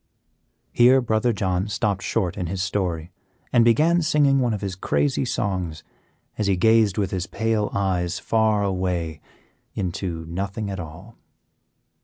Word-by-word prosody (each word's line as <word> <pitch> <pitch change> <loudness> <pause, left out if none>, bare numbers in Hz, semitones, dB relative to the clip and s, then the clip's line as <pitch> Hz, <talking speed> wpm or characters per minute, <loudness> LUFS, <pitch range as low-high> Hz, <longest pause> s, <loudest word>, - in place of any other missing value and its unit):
'" - - -47
Here 125 +2 +6
Brother 120 -1 +1
John 95 -2 -1
stopped 105 -2 -1
short 95 -7 -1
in 90 - -3
his 95 +1 -2
story, 90 -3 -2 0.4
and 120 -2 +6
began 155 +9 +4
singing 145 -3 +3
one 125 -2 +1
of 105 - -3
his 100 -2 -3
crazy 135 +9 0
songs, 90 -9 -2 0.6
as 105 - +1
he 100 - +3
gazed 110 0 +4
with 100 -3 0
his 95 -1 -2
pale 110 -2 0
eyes 90 -3 -1
far 110 0 +1
away 90 -5 -2 0.5
into 90 -3 -3
nothing 100 +5 -4
at 95 - -5
all. 85 +7 -10
100 Hz, 150 wpm, -23 LUFS, 90-115 Hz, 0.6 s, Here